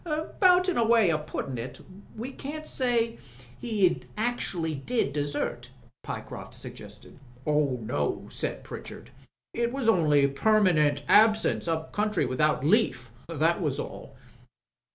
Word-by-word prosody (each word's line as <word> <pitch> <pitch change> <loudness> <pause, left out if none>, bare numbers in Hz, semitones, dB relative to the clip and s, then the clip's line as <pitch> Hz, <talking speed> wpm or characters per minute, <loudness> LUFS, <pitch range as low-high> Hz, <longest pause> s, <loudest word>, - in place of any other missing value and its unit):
"But, 360 +3 +2
in 370 - 0
a 235 - +4
way 225 -6 +4
o' 155 - 0
puttin' 140 -4 -5
it, 120 +3 -7 0.4
we 240 +5 -5
can't 300 +4 -7
say 235 -4 0
that - - -21 0.4
he 205 -6 +1 0.2
actually 205 -8 -1
did 145 - -1
desert," 145 -4 -3 0.3
Pyecroft - - -7
suggested. - - -11 0.3
"Oh, 150 -4 +1
no," 75 -9 -2
said - - -3
Pritchard. - - -9 0.4
"It 235 0 0
was 265 -3 -2
only 150 -9 +4
permanent 150 -3 +2
absence 215 -4 +4
up 160 -1 -2
country 210 0 0
without 150 +1 +1
leaf. 150 - +2 0.2
That 165 +3 +1
was 150 -5 -1
all." - - -7
180 Hz, 130 wpm, -27 LUFS, 145-235 Hz, 0.4 s, a